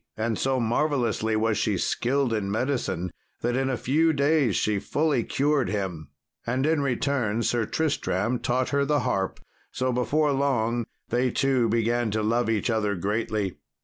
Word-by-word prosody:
And 110 Hz, +1 st, 0 dB
so 135 Hz, +2 st, 0 dB
marvellously 120 Hz, -2 st, 0 dB
was 110 Hz, 0 st, +1 dB
she 105 Hz, -3 st, +1 dB
skilled 130 Hz, +6 st, 0 dB
in 105 Hz, -3 st, -1 dB
medicine, 110 Hz, -6 st, -1 dB, 0.3 s
that 120 Hz, +1 st, 0 dB
in 135 Hz, 0 st, 0 dB
a 130 Hz, -, -1 dB
few 160 Hz, +7 st, +2 dB
days 140 Hz, -5 st, +2 dB
she 105 Hz, -2 st, +1 dB
fully 145 Hz, +3 st, 0 dB
cured 140 Hz, +1 st, +1 dB
him; 95 Hz, -7 st, -3 dB, 0.3 s
and 130 Hz, +3 st, -1 dB
in 155 Hz, -1 st, +2 dB
return 125 Hz, -4 st, 0 dB
Sir 115 Hz, -2 st, 0 dB
Tristram 120 Hz, -, 0 dB
taught 125 Hz, +1 st, 0 dB
her 140 Hz, 0 st, +1 dB
the 145 Hz, +1 st, +1 dB
harp; 95 Hz, -1 st, -1 dB, 0.3 s
so, 130 Hz, 0 st, -1 dB
before 145 Hz, +5 st, +1 dB
long, 120 Hz, -4 st, 0 dB, 0.2 s
they 125 Hz, +2 st, +1 dB
two 130 Hz, -2 st, +1 dB
began 115 Hz, +1 st, +1 dB
to 110 Hz, +1 st, -1 dB
love 115 Hz, +2 st, +1 dB
each 115 Hz, +2 st, +1 dB
other 105 Hz, -2 st, 0 dB
greatly. 105 Hz, 0 st, -2 dB
120 Hz, 160 wpm, -26 LUFS, 110-140 Hz, 0.3 s, few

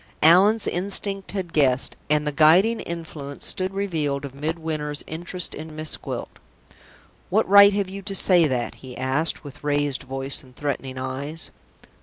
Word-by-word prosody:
Allan's 195 Hz, +7 st, +6 dB
instinct 195 Hz, +2 st, -1 dB
had 185 Hz, -4 st, -4 dB
guessed, 135 Hz, -3 st, +2 dB
and 150 Hz, 0 st, +2 dB
the 150 Hz, -, 0 dB
guiding 175 Hz, +10 st, +5 dB
influence 160 Hz, -4 st, -7 dB
stood 185 Hz, -1 st, -1 dB
revealed 160 Hz, -8 st, -2 dB
of 135 Hz, -, -8 dB
Midwinter's 155 Hz, 0 st, -3 dB
interest 175 Hz, +2 st, -3 dB
in 155 Hz, 0 st, -8 dB
Miss 155 Hz, 0 st, -3 dB
Gwilt. -, -, -7 dB, 0.9 s
"What -, -, +2 dB
right 200 Hz, +1 st, +8 dB
have 200 Hz, -1 st, 0 dB
you 195 Hz, +1 st, -7 dB
to 195 Hz, 0 st, -5 dB
say 180 Hz, -4 st, +4 dB
that?" 125 Hz, -3 st, -2 dB
he 130 Hz, -2 st, -9 dB
asked, 135 Hz, +5 st, 0 dB
with 145 Hz, 0 st, -11 dB
raised 145 Hz, -2 st, 0 dB
voice 135 Hz, +1 st, -2 dB
and 130 Hz, -2 st, -19 dB
threatening 135 Hz, -2 st, -4 dB
eyes. 135 Hz, +5 st, -4 dB
155 Hz, 155 wpm, -23 LUFS, 140-185 Hz, 0.9 s, right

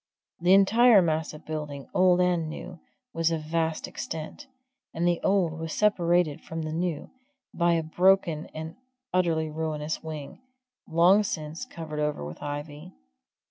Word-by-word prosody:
The 180 Hz, +3 st, +5 dB
entire 220 Hz, +3 st, +6 dB
mass 160 Hz, -1 st, -1 dB
of 150 Hz, +1 st, -12 dB
building, 150 Hz, -3 st, -5 dB
old 180 Hz, -1 st, +4 dB
and 175 Hz, -3 st, +1 dB
new, 170 Hz, +2 st, -8 dB, 0.3 s
was 165 Hz, 0 st, +1 dB
of 160 Hz, -2 st, -2 dB
vast 160 Hz, 0 st, -1 dB
extent, 160 Hz, -, -7 dB, 0.5 s
and 170 Hz, +2 st, +1 dB
the 175 Hz, -1 st, +1 dB
old 175 Hz, -5 st, +1 dB
was 160 Hz, -1 st, -4 dB
separated 175 Hz, -6 st, +2 dB
from 160 Hz, 0 st, -6 dB
the 155 Hz, 0 st, -4 dB
new 165 Hz, -2 st, -3 dB, 0.4 s
by 170 Hz, 0 st, +2 dB
a 165 Hz, -1 st, +1 dB
broken 175 Hz, -1 st, +2 dB
and 160 Hz, +1 st, -8 dB, 0.4 s
utterly 165 Hz, -4 st, +1 dB
ruinous 155 Hz, -1 st, -3 dB
wing, 155 Hz, -, -8 dB, 0.5 s
long 175 Hz, +5 st, +5 dB
since 160 Hz, -5 st, -4 dB
covered 155 Hz, -2 st, -7 dB
over 150 Hz, -, -1 dB
with 75 Hz, +2 st, -9 dB
ivy. 145 Hz, +1 st, -6 dB
160 Hz, 145 wpm, -27 LUFS, 155-175 Hz, 0.5 s, entire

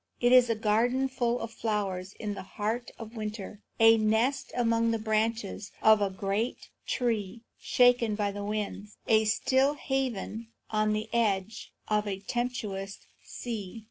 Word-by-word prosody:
It 245 Hz, 0 st, +3 dB
is 250 Hz, -1 st, +7 dB
a 230 Hz, -, +2 dB
garden 230 Hz, +5 st, +2 dB
full 245 Hz, -2 st, -1 dB
of 230 Hz, -, -5 dB
flowers 200 Hz, -4 st, -2 dB
in 210 Hz, -2 st, -4 dB
the 195 Hz, -, -6 dB
heart 215 Hz, +5 st, -3 dB
of 225 Hz, +1 st, -9 dB
winter; 210 Hz, -1 st, -6 dB, 0.2 s
a 225 Hz, 0 st, +7 dB
nest 220 Hz, +5 st, +1 dB
among 230 Hz, -1 st, +2 dB
the 225 Hz, -, +1 dB
branches 220 Hz, -1 st, -1 dB
of 220 Hz, -1 st, +5 dB
a 200 Hz, -, +2 dB
great 195 Hz, +4 st, -3 dB, 0.2 s
tree 225 Hz, -3 st, -1 dB, 0.2 s
shaken 245 Hz, -3 st, +3 dB
by 205 Hz, -1 st, 0 dB
the 205 Hz, 0 st, -6 dB
winds; 210 Hz, 0 st, -4 dB
a 220 Hz, -1 st, +4 dB
still 265 Hz, +6 st, +2 dB
haven 250 Hz, -5 st, -3 dB, 0.2 s
on 215 Hz, 0 st, +2 dB
the 215 Hz, 0 st, -2 dB
edge 210 Hz, -2 st, 0 dB, 0.2 s
of 210 Hz, 0 st, +1 dB
a 195 Hz, -2 st, -2 dB
tempestuous 200 Hz, -4 st, -4 dB, 0.2 s
sea. 225 Hz, -3 st, -6 dB
220 Hz, 150 wpm, -29 LUFS, 205-235 Hz, 0.2 s, is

